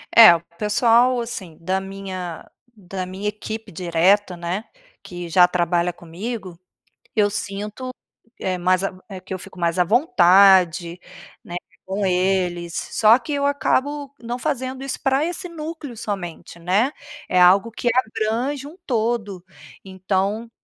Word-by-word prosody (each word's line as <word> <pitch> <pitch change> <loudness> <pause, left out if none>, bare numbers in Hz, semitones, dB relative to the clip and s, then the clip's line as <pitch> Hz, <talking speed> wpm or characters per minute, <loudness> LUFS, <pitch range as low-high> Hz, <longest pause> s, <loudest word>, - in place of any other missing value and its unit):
É, 220 -7 +10
o 165 - -4 0.2
pessoal, 235 +4 +3
assim, 195 -9 -7
da 190 +3 0
minha 190 -3 -7 0.3
da 185 0 -5
minha 190 +3 -5
equipe 215 +1 -5
direta, 180 +3 +2
né, 175 +5 -3 0.4
que 175 -1 -7
já 180 +2 +6
trabalha 175 0 +1
comigo, 185 +3 -7 0.6
eu 210 -2 +3
sinto, 210 +5 -5 0.5
eh, 185 -1 -1
mais 185 +1 +2
a 185 -1 -4
eh, 190 - -7
que 190 +1 -7
eu - - -4
fico 185 - -12
mais 170 +1 0
à 180 - +5
vontade, 185 - +4 0.5
né, 175 - -7 0.3
com 195 +1 -1
eles. 180 -2 0 0.2
Só 225 +2 +6
que 295 - -6
eu 280 0 0
acabo 285 0 0
não 240 +1 -4
fazendo 260 -2 -3
isso 275 - -4
pra 270 +1 +2
esse 355 +2 -4
núcleo 315 -4 -7
somente, 180 -6 -6
né? 190 +9 +1 0.4
É 185 - +2
algo 190 +5 +5
que 240 +2 -2
abrange 250 +4 -1
um 305 +4 -11
todo, 220 -6 -1 0.4
então 195 +4 -2
195 Hz, 140 wpm, -22 LUFS, 180-235 Hz, 0.6 s, É